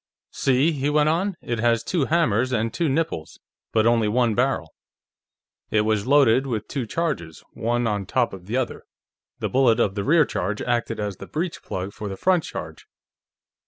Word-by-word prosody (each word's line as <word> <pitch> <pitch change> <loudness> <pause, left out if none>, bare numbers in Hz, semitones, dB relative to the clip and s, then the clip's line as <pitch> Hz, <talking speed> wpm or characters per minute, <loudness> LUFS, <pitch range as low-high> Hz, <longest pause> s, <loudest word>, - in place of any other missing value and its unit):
"See," 135 +4 +2
he 145 -2 -1
went 150 0 +3
on, 185 +4 0
"it 120 -1 -2
has 115 0 +2
two 165 -1 0
hammers 130 -7 +2
and 115 -2 0
two 165 -3 0
nipples, 135 - -2 0.3
but 110 -1 +2
only 115 -2 +3
one 120 +1 +2
barrel. 125 - 0 1.0
It 105 - +3
was 110 0 0
loaded 135 -2 +4
with 110 -4 -3
two 130 -6 -3
charges, 130 - -3
one 120 +1 -1
on 105 -4 -1
top 125 -1 +1
of 95 -1 -10
the 115 +4 -1
other; 130 -2 -3 0.5
the - - -2
bullet 125 -3 +3
of 100 -4 +2
the 100 -1 -3
rear 155 +4 +4
charge 100 -1 -3
acted 120 -2 -1
as 100 -3 -3
the - - -9
breech 165 +2 -3
plug 95 +2 -5
for 105 -2 -6
the 95 - -6
front 180 - +2
charge.... - - -8
120 Hz, 185 wpm, -23 LUFS, 105-145 Hz, 1.0 s, loaded